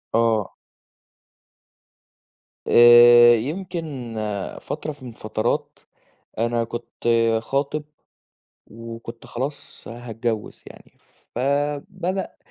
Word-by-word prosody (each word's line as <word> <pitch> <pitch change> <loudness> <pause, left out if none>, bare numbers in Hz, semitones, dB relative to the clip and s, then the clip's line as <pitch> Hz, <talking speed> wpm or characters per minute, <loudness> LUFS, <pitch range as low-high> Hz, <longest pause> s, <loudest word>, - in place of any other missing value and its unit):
آه. 115 -3 +1 2.1
آآ، 120 0 +8
يمكن 150 - -5 0.5
فترة 155 - -5
من 140 -3 -11
الفترات 110 -2 -3 0.6
أنا 115 +1 0
كنت 120 +1 -7 0.3
خاطب 140 +4 -2 0.8
وكنت 115 0 -10
خلاص 140 +4 -7
هاتجوِّز 115 -1 -5
يعني، - - -15 0.4
فبدأ 145 +8 -2
120 Hz, 65 wpm, -22 LUFS, 115-140 Hz, 2.1 s, آآ